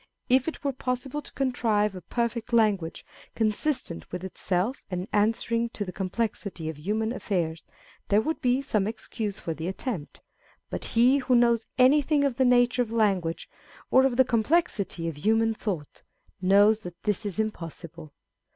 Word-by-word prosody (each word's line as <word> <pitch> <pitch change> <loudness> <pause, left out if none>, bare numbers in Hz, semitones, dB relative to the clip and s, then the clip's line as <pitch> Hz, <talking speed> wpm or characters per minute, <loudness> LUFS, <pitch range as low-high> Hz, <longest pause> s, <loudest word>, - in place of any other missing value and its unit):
If 260 +2 +4
it 325 - -4
were 280 -1 0
possible 255 +3 -3
to - - -13
contrive 225 -6 +1
a 185 - -8
perfect 235 +6 -2
language, 205 -8 +1 0.3
consistent 220 - -1
with 180 0 -5
itself, 190 +5 -1
and 180 0 -3
answering 230 +2 +1
to 205 - -2
the 180 - -6
com 190 0 -4
plexity 195 -6 -3
of 155 - -13
human 220 +7 -1
affairs, 170 -9 -2 0.4
there 205 - +4
would 315 +9 -2
be 255 +2 +2
some 215 -7 0
excuse 220 -2 -4
for 165 - -4
the 160 +2 -5
attempt; 190 - -5 0.5
but - - -3
he 250 +4 +4
wrho 250 -1 +3
knows 235 -1 +3
anything 285 +3 +4
of 270 -3 0
the 260 - +3
nature 245 0 +4
of 230 -2 -2
language, 195 -7 0 0.4
or 260 - +6
of 245 -2 -3
the 260 - +6
complexity 230 - 0
of 165 -3 -4
human 225 +6 +2
thought, 185 -9 -5 0.4
knows 205 +3 +5
that 175 -4 -10
this 210 0 0
is 205 -4 -4
impossible. 170 -6 -5
220 Hz, 165 wpm, -27 LUFS, 185-245 Hz, 0.5 s, or